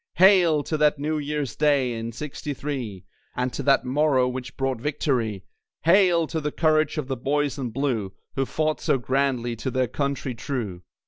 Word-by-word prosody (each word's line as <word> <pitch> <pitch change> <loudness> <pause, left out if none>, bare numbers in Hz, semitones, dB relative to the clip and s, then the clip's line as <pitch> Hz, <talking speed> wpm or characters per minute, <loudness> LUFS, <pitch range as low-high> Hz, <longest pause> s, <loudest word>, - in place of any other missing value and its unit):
Hail! 180 -5 +5
to 155 - -2
that 150 -1 +3
New 150 +2 -1
Year's 145 -3 -3
Day 140 -5 +2
in 115 0 -4
'Sixty 145 +4 -5
three, 120 -11 -5 0.3
And 125 0 -1
to - - -3
that 135 -2 +3
morrow 135 -1 +2
which 125 0 -6
brought 135 -3 -1
victory. 125 -8 -1 0.4
Hail! 175 -1 +5
to 160 0 -3
the 150 0 -2
courage 155 -1 +2
of 150 -4 -2
the 135 - -2
Boys 145 +3 -1
in 125 -3 -2
Blue, 115 -5 -1 0.2
Who 135 -1 -1
fought 155 0 -1
so - - +2
grandly, 130 -2 0
to 130 - -3
their 130 -1 0
Country 140 -1 -2
true. 110 -7 -4
140 Hz, 180 wpm, -25 LUFS, 125-150 Hz, 0.4 s, Hail